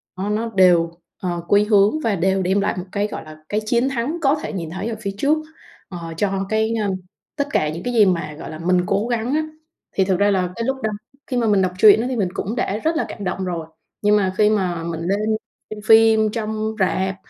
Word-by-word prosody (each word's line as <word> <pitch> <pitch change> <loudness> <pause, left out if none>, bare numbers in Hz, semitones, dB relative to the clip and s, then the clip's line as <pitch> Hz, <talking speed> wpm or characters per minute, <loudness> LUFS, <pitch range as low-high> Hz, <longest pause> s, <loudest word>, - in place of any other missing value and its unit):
á, 195 +3 -3
nó 225 +2 -1
đều, 175 -3 +5 0.3
ờ, 175 -2 -2
quy 205 +1 +4
hướng 210 +7 +4
và 215 -3 +1
đều 190 +2 +1
đem 190 +2 +1
lại - - 0
một 180 - -4
cái, 205 +1 0
gọi - - -7
là, 155 0 -11
cái 210 - 0
chiến 240 +4 +2
thắng 270 +6 -2
có 280 +1 +3
thể - - -4
nhìn 170 -4 -4
thấy 190 +5 -4
ở 225 - -3
phía 200 -1 -2
trước, 295 +7 +2 0.5
ờ, 170 -3 -7
cho 195 0 0
cái, 220 +1 +1
ơ, 200 - 0 0.5
tất 285 0 -1
cả 150 - +1
những 165 +3 -6
cái 245 - -2
gì 215 -3 +6
mà, 170 -5 -1
gọi - - -7
là, 155 - -8
mình 180 +1 +2
cố 200 +4 0
gắng 240 +2 -1
á. 310 +1 +1 0.5
Thì 190 - +2
thực 190 -1 +1
ra 205 0 +4
là 185 -2 +1
cái 230 - -3
lúc 265 0 -1
đó 220 - +1 0.4
khi 250 - -2
mà 230 -2 +1
mình 200 -2 +3
đọc 185 -1 +1
truyện 215 +2 +7
á, 245 - -2
thì 255 - -2
mình 195 -5 0
cũng 215 +5 -3
đã 210 -3 -1
rất 320 +7 -1
là - - 0
cảm 205 - -7
động 185 0 -2
rồi. 170 -3 -4 0.3
Nhưng 210 0 +4
mà 190 -2 0
khi 210 -1 +5
mà 180 -6 0
mình 165 -1 -4
lên 195 +4 0 0.5
xem 215 -1 -7
phim 220 -1 +5
trong 220 -1 -3
rạp, 190 +1 0
205 Hz, 250 wpm, -21 LUFS, 185-220 Hz, 0.5 s, truyện